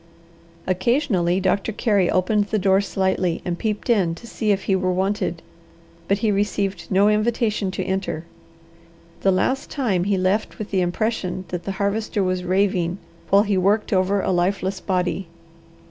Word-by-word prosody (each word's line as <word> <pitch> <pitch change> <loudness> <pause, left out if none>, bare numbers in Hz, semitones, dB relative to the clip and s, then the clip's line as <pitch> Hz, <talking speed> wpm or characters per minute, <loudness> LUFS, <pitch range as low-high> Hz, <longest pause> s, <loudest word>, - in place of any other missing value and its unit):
Occasionally 185 - +1
Doctor 195 +3 0
Carey 205 -4 +1
opened 205 +3 +2
the 215 +1 -1
door 195 -1 +3
slightly 190 -3 0
and 175 -1 -2
peeped 210 -2 -2
in 190 -9 +2
to 235 - -13
see 220 -2 -1
if 195 -1 0
he 195 - +1
were 185 -1 0
wanted, 190 -2 -1 0.6
but 200 - +2
he 215 - +3
received 200 -1 -1
no 195 +2 +4
invitation 215 -1 +1
to 185 - -3
enter. 190 -4 -3 1.0
The 195 - +3
last 260 +9 0
time 205 - 0
he 200 -1 +1
left 185 +4 0
with 215 - -6
the 190 -2 +2
impression 185 0 -2
that 180 -1 -5
the 195 - -2
Harvester 200 +1 -1
was 185 -1 -1
raving, 185 -1 +1 0.3
while 200 +1 +5
he 200 -3 +1
worked 205 +4 +1
over 190 +1 +2
a - - 0
lifeless 185 +1 0
body. 185 0 -1
195 Hz, 160 wpm, -22 LUFS, 185-210 Hz, 1.0 s, while